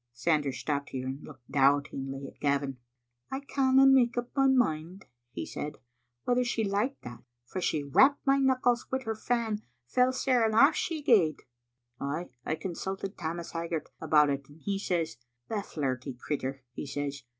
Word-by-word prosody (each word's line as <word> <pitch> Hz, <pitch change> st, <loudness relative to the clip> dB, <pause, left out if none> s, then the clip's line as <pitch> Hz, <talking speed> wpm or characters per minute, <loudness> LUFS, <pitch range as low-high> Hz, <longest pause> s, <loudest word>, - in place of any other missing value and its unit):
'" 120 Hz, -, -54 dB
Sanders 150 Hz, -5 st, +2 dB
stopped 140 Hz, -2 st, -2 dB
here 130 Hz, -1 st, -4 dB
and 135 Hz, +2 st, -5 dB
looked 130 Hz, -5 st, -13 dB
doubtingly 135 Hz, -1 st, +1 dB
at -, -, -12 dB
Gavin. 140 Hz, -2 st, 0 dB, 0.3 s
" 120 Hz, 0 st, -46 dB
I 265 Hz, -, -2 dB
canna 270 Hz, -1 st, +4 dB
make 260 Hz, -3 st, +5 dB
up 240 Hz, 0 st, -2 dB
my 270 Hz, -1 st, +4 dB
mind," 190 Hz, -8 st, +1 dB, 0.3 s
he -, -, -4 dB
said, 150 Hz, 0 st, -5 dB, 0.2 s
" 120 Hz, 0 st, -50 dB
whether 250 Hz, 0 st, +2 dB
she 240 Hz, -2 st, 0 dB
liked 205 Hz, +7 st, -1 dB
that, 120 Hz, -1 st, -9 dB, 0.2 s
for 185 Hz, +9 st, -5 dB
she 155 Hz, -4 st, 0 dB
rapped 265 Hz, -, +4 dB
my 275 Hz, 0 st, +4 dB
knuckles 255 Hz, -2 st, +2 dB
wi' 260 Hz, 0 st, -1 dB
her 225 Hz, -2 st, -2 dB
fan 220 Hz, -1 st, -1 dB, 0.3 s
fell 250 Hz, -, +3 dB
sair, 255 Hz, -2 st, +2 dB
and 220 Hz, -1 st, +2 dB
aflE 275 Hz, +7 st, +7 dB
she 315 Hz, -2 st, -2 dB
gaed. 185 Hz, -, +4 dB, 0.6 s
Ay, 150 Hz, +5 st, -3 dB
I 155 Hz, -, -1 dB
consulted 190 Hz, +4 st, -4 dB
Tammas 170 Hz, 0 st, -4 dB
Hag 165 Hz, 0 st, -4 dB
gart 165 Hz, -2 st, -3 dB
about 150 Hz, -2 st, +4 dB
it, 140 Hz, 0 st, -4 dB
and 145 Hz, +2 st, -16 dB
he 200 Hz, -1 st, -1 dB
says, 175 Hz, -5 st, -1 dB, 0.3 s
*The 215 Hz, -2 st, -1 dB
flirty 135 Hz, -6 st, -3 dB
crittur,' 135 Hz, 0 st, -4 dB
he 145 Hz, -, -6 dB
says. 140 Hz, 0 st, -3 dB
165 Hz, 185 wpm, -29 LUFS, -, 0.6 s, aflE